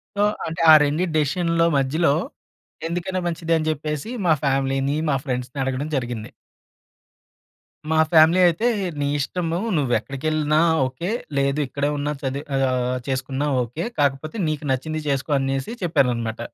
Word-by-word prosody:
So 200 - 0 0.3
అంటే 160 0 -4
ఆ - - +10
రెండిటి 155 +4 0
డేసిషన్లో 165 +2 +1
మధ్యలో 140 +3 +2 0.7
ఎందుకైనా 180 +2 -2
మంచిది 165 -1 -1
అని 155 0 -2
చెప్పేసి 150 +4 -4 0.2
మా 165 - +5
ఫ్యామిలీని, 135 +1 +1
మా 140 - +2
ఫ్రెండ్స్‌ని 125 0 -4
అడగడం 135 +3 -2
జరిగింది. 120 -4 -3 1.6
మా 160 - +2
ఫ్యామిలీ 160 +2 +6
అయితే 175 +8 +1 0.3
నీ 145 - 0
ఇష్టను 165 +4 -2 0.2
నువ్వు 135 -5 0
ఎక్కడికెళ్ళినా 150 +2 0 0.3
ఓకే. 130 +10 -4 0.3
లేదు 140 +1 +1
ఇక్కడే 140 +2 -1
ఉన్నా 145 +1 -1
చదివి 140 +1 -3
ఆహ్, 130 -1 0
చేసుకున్నా 135 +2 -2 0.2
ఓకే. 125 +8 -5 0.2
కాకపోతే 145 +7 0
నీకు 155 -1 -3
నచ్చింది 155 +5 -2
చేసుకో 140 +1 -1
అనేసి 135 - -2
చెప్పారు 140 -7 +2
అన్నమాట. 115 -1 -4
145 Hz, 140 wpm, -22 LUFS, 135-160 Hz, 1.6 s, ఆ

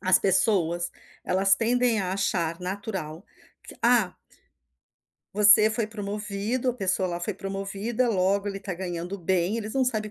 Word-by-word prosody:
As 185 -2 +5
pessoas, 175 -3 +1 0.3
elas 195 +2 +3
tendem 235 +1 +1
a 185 -1 -3
achar 170 -4 -1
natural, 185 -3 -6 0.4
que - - -12
ah 235 -6 +2 1.2
você 210 +1 +7
foi 215 0 -1
promovido, 210 +3 -3
a - - -7
pessoa 190 -4 0
lá 175 0 -4
promovida, 195 +6 -3
logo 200 0 0
ele 195 - -5
está 195 -2 -6
ganhando 175 +1 -5
bem, 185 +3 -1
eles 215 -1 -5
não 265 -1 +2
sabem 215 -4 -2
195 Hz, 145 wpm, -25 LUFS, 185-215 Hz, 1.2 s, você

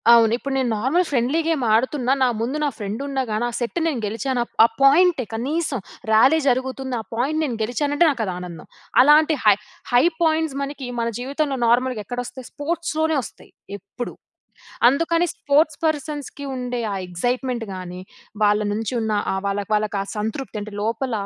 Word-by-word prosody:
అవును. 225 -2 +5
ఇప్పుడు 275 +2 -4
నేను 260 -2 +1
నార్మల్ 300 +11 +2
ఫ్రెండ్లీ 265 +3 +1
గేమ్ 320 -5 0
ఆడుతున్నా, 260 +2 +1
నా - - +5
ముందు 255 +6 -1
నా - - +2
ఫ్రెండ్ 210 0 -4
ఉన్నాగాని 255 -5 -1
ఆ - - -3
సెట్ 240 +7 -2
నేను 275 -8 -1
గెలిచాను 240 +4 -1 0.2
ఆ - - +4
పాయింటే, 300 +1 +5
కనీసం 275 +4 -1 0.3
ర్యాలీ 260 +9 +5
జరుగుతుంది 260 0 0
ఆ - - -12
పాయింట్ 285 +7 0
నేను 260 -6 -2
గెలిచానంటే 290 +8 +1
నాకు 270 -5 -2
అది 185 - -3
ఆనందం. 175 -3 -8 0.4
అలాంటి 305 +2 +5
హై 210 -2 +7 0.4
హై 245 +1 +5 0.2
పాయింట్స్ 320 -3 +1
మనకి 275 -2 -5
మన 230 - 0
జీవితంలో 280 +2 -1
నార్మల్‌గా 245 -1 +2
ఎక్కడ 245 +4 -5
వస్తాయి 255 0 -9
స్పోర్ట్స్‌లోనే 315 0 -1
వస్తాయి, - - -12 0.3
ఎప్పుడు. 240 +5 -7 0.8
అందుకని 335 +5 +1
స్పోర్ట్స్ 290 +1 +1
పర్సన్స్‌కి 295 -2 -3
ఉండే 250 -1 -3
ఆ - - -2
ఎగ్జైట్మెంట్‌గానీ 195 -3 -3 0.4
వాళ్ళ 210 0 +3
నుంచి 220 +2 -3
ఉన్న 220 -1 -1 0.2
ఆహ్, 190 - -1
వాళ్ళకి 200 +1 -3
వాళ్ళకి 210 -1 -1
ఆ - - -5
సంతృప్తి 220 +2 -4
అంటే 210 0 -8
లోపల 230 +4 -2
255 Hz, 160 wpm, -22 LUFS, 225-290 Hz, 0.8 s, హై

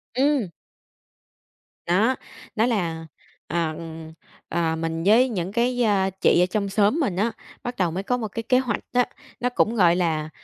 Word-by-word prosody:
Ừm. 270 -6 +2 1.4
Đó. 215 +9 +3 0.4
Đó 220 - +3
là, 170 -9 -1 0.4
ờ, 170 -2 0
ừm, 160 -1 -8 0.4
à, 165 -1 0
mình 165 0 -3
với 240 +5 +5
những 185 -4 -3
cái, 245 +2 +1
a, 195 -3 +2
chị 190 -2 +3
ở - - +4
trong 200 +2 -2
xóm 205 +9 +2
mình 230 - 0
á, 215 +5 +1 0.3
bắt 245 0 -4
đầu 180 -3 +1
mới 190 +4 -3
có 250 +4 0
một 225 - -3
cái 230 +3 -5
kế 255 +2 +3
hoạch 255 -2 -1
á, 245 0 +4 0.3
nó 245 - 0
cũng 235 -2 +1
gọi 175 -5 +5
là, 160 -3 0
200 Hz, 180 wpm, -24 LUFS, 170-240 Hz, 1.4 s, với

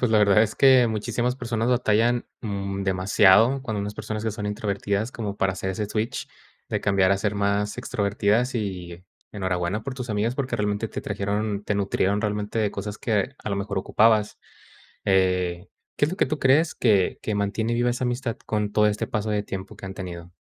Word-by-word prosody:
pues, 125 - +1
la 110 - +5
verdad 105 +1 +5
es 110 - -1
que, 130 -3 +6
muchísimas 120 +3 -1
personas 115 -2 -2
batallan, 120 0 +2 0.2
mm, 100 -2 -3
demasiado 95 +6 +4
cuando 110 -5 -3
unas 105 +1 -4
personas 110 +1 -5
que 110 - 0
son 105 0 -5
introvertidas, 105 +1 -2
como 105 -3 -4
para 95 -1 +1
hacer 95 +1 -3
ese 105 +2 -3
switch, 110 +2 -3 0.4
de - - -1
cambiar 100 -2 +3
a 95 - +1
ser 105 -1 -1
más 100 +1 0
extrovertidas, 110 +2 0
y, 90 -5 -4 0.3
enhorabuena 95 0 -2
por 135 - -5
tus 125 -2 -5
amigas, 110 +4 0
porque 130 -3 -2
realmente 105 0 -1
te - - -6
trajeron, 105 0 -2
te 105 - -1
nutrieron 100 0 +1
realmente 105 +1 -2
de 105 -2 +1
cosas 105 +1 -6
que, 110 +4 0
a 110 - -4
lo 100 - -1
mejor 100 0 -2
ocupabas. 110 +2 +2 0.7
Eh, 90 -2 +1 0.3
¿qué - - +3
es 150 - 0
lo 185 - -4
que - - +2
tú 155 - -2
crees 145 +5 +3
que 100 -6 +2
que 105 - -2
mantiene 110 +3 -1
viva 120 +1 +2
esa 125 +1 -2
amistad 120 -1 -2
con 105 -1 -1
todo 105 0 +4
este 105 0 -2
paso 110 0 -2
de 105 -1 0
tiempo 95 -1 -7
que - - -9
han 95 - -7
tenido? 90 -2 -8
105 Hz, 200 wpm, -24 LUFS, 100-115 Hz, 0.7 s, que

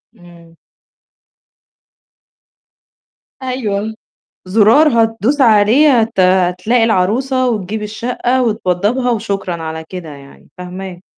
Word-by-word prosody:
إمم. 170 -3 -18 2.9
أيوه، 220 -4 -3 0.5
زُرار 225 +5 +4
هتدوس 225 +6 -1
عليه 235 +4 +4
هت 220 -3 -3
هتلاقي 185 +5 +2
العروسة 245 +5 +1
وتجيب 210 -1 -3
الشَقّة 240 +4 -2
وتوضّبها 220 +3 -1
وشكرًا 195 -6 -3
على 160 0 -6
كده 180 -4 -8
يعني، 140 -1 -15
فهماك. 180 0 -8
210 Hz, 85 wpm, -15 LUFS, 180-240 Hz, 2.9 s, زُرار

